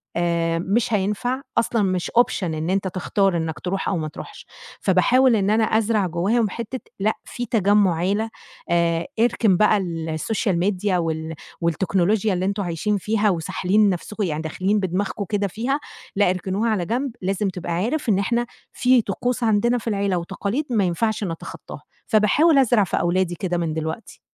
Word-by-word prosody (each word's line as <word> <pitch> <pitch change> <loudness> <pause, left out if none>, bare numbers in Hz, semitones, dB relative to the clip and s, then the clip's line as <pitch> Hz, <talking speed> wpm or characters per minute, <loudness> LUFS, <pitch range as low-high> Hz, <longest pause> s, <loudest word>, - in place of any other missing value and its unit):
آآ 170 -1 0
مش 210 +6 0
هينفع 210 +6 0 0.2
أصلًا 230 -1 +2
مش 185 -2 -1
Option 240 -4 +2
إن 160 -1 -2
أنت 190 0 0
تختار 190 0 0
إنّك 160 -1 -3
تروح 190 +2 -3
أو 190 - 0
ما 155 -1 -2
تروحش، 420 - -10 0.4
فباحاول 235 +7 +4
إن 200 -2 +1
أنا 220 +1 +3
أزرع 220 -2 +1
جوّاهم 200 +7 +1
حِتّة 235 +5 -5 0.2
لأ، 210 +3 +2
في 245 - -5
تجمُّع 205 -4 +3
عيلة، 200 +7 0 0.4
آآ 170 -1 +1
اركن 225 -4 +3
بقى 210 +1 +4
الSocial 170 +4 -2
Media 205 0 0
وال 160 -2 -1 0.3
والتكنولوجيا 190 +5 +1
اللي 180 0 -1
أنتم 200 +1 -1
عايشين 180 +4 -1
فيها، 210 +2 +1
وساحلين 190 +4 +1
نَفْسكم 205 +4 -3
يعني 155 -4 -2
داخلين 185 +6 0
بدماغكم 195 +2 -2
كده 205 -1 0
فيها 240 +9 -2 0.4
لأ، 200 -2 +3
اركنوها 190 +5 -1
على 200 -6 0
جنب، 250 +7 -1
لازم 195 +2 0
تبقى 180 -2 -6
عارف 235 - -1
إن 195 -2 +3
إحنا 235 +4 0 0.3
في 250 -1 +4
طقوس 245 +5 -2
عندنا 230 +2 +2
في 235 - -7
العيلة، 200 -3 0
وتقاليد 200 - -3
ما 220 -5 +2
ينفعش 210 +5 0
نتخطاها 165 -4 -7 0.3
فباحاول 270 +9 +4
أزرع 240 -5 +4
في 190 - -2
أولادي 175 0 0
كده 175 0 -2
من 165 -2 -1
دلوقتي. 160 +6 -5
195 Hz, 165 wpm, -22 LUFS, 175-220 Hz, 0.4 s, فباحاول